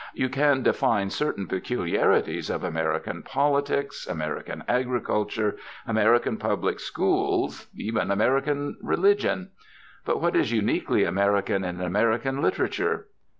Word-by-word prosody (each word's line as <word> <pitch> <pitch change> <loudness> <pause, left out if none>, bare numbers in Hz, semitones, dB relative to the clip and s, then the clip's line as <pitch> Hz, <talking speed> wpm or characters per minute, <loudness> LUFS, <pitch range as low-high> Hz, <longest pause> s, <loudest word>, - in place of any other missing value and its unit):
You 130 - 0
can 140 0 +2
define 100 -3 +2
certain 100 -9 -1
peculiarities 95 -1 0
of - - -2
American 80 -2 -2
politics, 140 0 0
American 75 -3 -4
agriculture, 120 -4 0 0.3
American 110 +2 +3
public - - -1
schools, - - 0
even 110 -2 -2
American 135 +8 +1
religion. 195 0 +1 0.5
But - - 0
what - - +1
is 110 - +2
uniquely 110 -3 +1
American 100 0 +1
in 90 -1 -4
American 115 +8 +1
literature? 430 - 0
115 Hz, 110 wpm, -26 LUFS, 100-140 Hz, 0.5 s, American